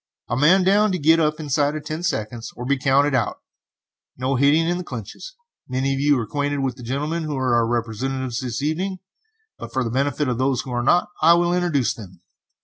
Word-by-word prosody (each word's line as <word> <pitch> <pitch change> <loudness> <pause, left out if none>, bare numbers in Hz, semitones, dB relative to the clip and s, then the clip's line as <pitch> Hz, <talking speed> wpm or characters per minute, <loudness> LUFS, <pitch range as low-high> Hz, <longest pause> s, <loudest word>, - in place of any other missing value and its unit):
A 120 - 0
man 170 +9 +4
down 205 +3 +3
to - - 0
get 160 +1 +4
up 155 -1 +1
inside 145 0 0
of 155 - -6
ten 155 +2 -4
seconds 120 -8 -3
or 125 - -6
be 140 +2 +2
counted 140 +1 +2
out. 120 -5 0 0.8
No 130 +2 -1
hitting 145 +5 +3
in 175 +1 0
the - - -4
clinches. 130 - -8 0.3
Many 130 +1 -1
of 135 - -2
you 145 0 +3
are 120 - -1
acquainted 145 +4 -2
with 130 -2 -1
the 125 - -13
gentlemen 145 +7 -2
who 150 -2 -3
are 130 -2 +1
our 120 -1 +3
representatives 120 +2 -2
this 125 0 -4
evening, 185 +6 -1 0.6
but - - -8
for 130 - 0
the 115 - -3
benefit 140 +3 0
of 125 -1 -1
those 130 -1 +1
who 130 - -9
are 120 0 -1
not 175 +9 +3
I 165 +2 +7
will 175 0 +2
introduce 170 -8 +1
them." 95 -6 -12
140 Hz, 220 wpm, -22 LUFS, 125-155 Hz, 0.8 s, I